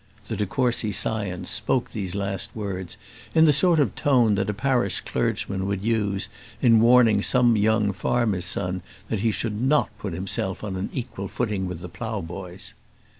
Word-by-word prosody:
The - - -2
de 105 - -1
Courcy 120 -2 0
scion 100 -2 -1
spoke 125 - 0
these 95 -5 -4
last 100 -1 -2
words 95 -4 -5 0.4
in 160 0 +7
the 150 - +5
sort 165 +3 +3
of 135 -9 +2
tone 125 -6 +3
that 100 0 0
a - - +2
parish 120 -3 +1
clergyman 95 -1 -2
would 100 -1 -2
use, 100 -4 0 0.3
in 115 -4 +5
warning 115 -3 +5
some 120 0 +4
young 105 0 +2
farmer's 100 -2 0
son 90 0 -2 0.3
that 110 - -1
he 115 +3 +1
should 110 0 -2
not 145 +4 +2
put 100 -4 -4
himself 95 +2 -2
on 100 -3 -4
an 95 +2 -3
equal 100 -6 -5
footing 105 -6 -2
with 90 -2 -6
the 90 - -6
ploughboys. 95 -2 -6
105 Hz, 175 wpm, -24 LUFS, 95-120 Hz, 0.4 s, in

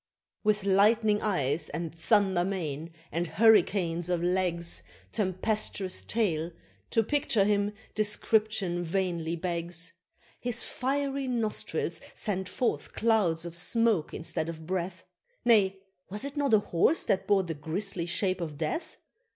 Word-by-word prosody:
With 210 -2 +2
lightning 210 +2 +4
eyes, 155 -7 0
and 165 +1 -4
thunder 190 +1 +2
mane, 165 -4 -3 0.2
and 170 +3 -1
hurricanes 180 -5 +3
of 175 -1 0
legs, 175 - 0 0.3
Tempestuous 195 -1 0
tail 170 -8 0 0.4
to 225 - +3
picture 235 -5 +2
him 205 0 +1 0.2
description 210 -3 +1
vainly 170 -2 -1
begs! 170 0 -3 0.5
His 245 -1 -1
fiery 275 +1 -1
nostrils 230 -4 -1
send 190 -4 -2
forth 235 +6 -1
clouds 200 -8 +2
of 170 -1 -6
smoke 215 -1 +1
instead 160 0 -2
of 160 -1 -7
breath 185 +1 -3 0.4
Nay, 200 -5 +4 0.3
was 205 +6 -4
it 280 +1 -5
not 280 -6 +3
a - - +5
Horse 205 - +2
that 190 - 0
bore 200 -2 +4
the 170 -2 -4
grisly 170 +4 -3
Shape 185 +1 0
of 155 -4 -4
Death? 160 - -3
190 Hz, 130 wpm, -29 LUFS, 170-215 Hz, 0.5 s, a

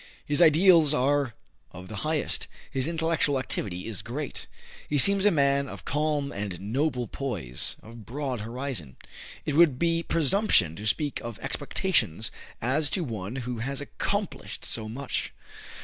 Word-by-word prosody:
His 145 +3 +1
ideals 165 -2 +6
are 140 -2 +1 0.4
of 90 0 -9
the 100 - -7
highest. 155 +4 -1 0.2
His 135 +1 -1
intellectual 160 -3 +1
activity 100 -7 -3
is 110 -5 -4
great. 135 +4 -6 0.4
He 145 - +1
seems 200 +7 +8
a - - +7
man 140 -4 +2
of - - -10
calm 145 -1 0
and 100 -3 -4
noble 125 +4 -1
poise, 95 - -2
of 115 0 -11
broad 130 -1 -4
horizon. 115 - -5 0.5
It 150 - -1
would 155 -5 +5
be 165 +2 +1
presumption 165 - +3
to 105 +2 -4
speak 145 +5 0
of 115 -3 -6
"expectations" 145 - 0 0.3
as 145 +5 +1
to 185 - 0
one 110 - -5
who 125 -2 -4
has 135 +4 -3
accomplished 200 +7 -3
so 110 -2 -2
much. 130 +4 -3
140 Hz, 150 wpm, -27 LUFS, 115-155 Hz, 0.5 s, seems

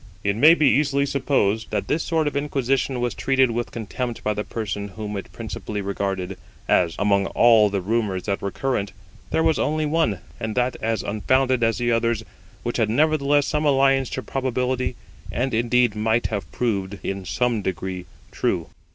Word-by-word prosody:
It 100 0 +1
may 155 +9 +7
be 155 -4 +3
easily 140 0 +3
supposed 130 -6 0
that 105 -2 -2
this 160 - +1
sort 160 -2 0
of 145 - -2
inquisition 135 -2 0
was 120 -1 0
treated 130 -2 +2
with 120 +1 -2
contempt 115 +2 -5
by 105 - +1
the 105 +1 -3
person 105 -3 -4
whom 105 +1 -6
it 100 - -6
principally 105 -1 -5
regarded; 95 -1 -3 0.3
as, 85 -3 +3
among 100 -1 +2
all 115 -3 +5
the 100 -1 -1
rumours 100 -2 -1
that 100 -1 -2
were 100 - -2
current, 105 -3 -2 0.4
there 160 - +1
was 160 -2 +2
only 155 +1 0
one, 150 - +1 0.2
and 110 -2 -3
that 125 0 +1
as 115 0 -1
unfounded 130 +5 +1
as 115 -1 +2
the 120 -1 0
others, 115 -1 +1 0.4
which 120 - -2
had 110 -3 +1
nevertheless 145 +2 +3
some 150 0 -1
alliance 135 -2 +3
to 130 - -4
probability, 130 -1 -1 0.4
and 130 +1 -1
indeed 120 0 +2
might 110 +2 +1
have 100 -8 -3
proved 100 -4 -2
in 95 0 -3
some 120 +3 0
degree 95 -1 -4 0.2
true. - - -1
115 Hz, 175 wpm, -23 LUFS, 105-135 Hz, 0.4 s, may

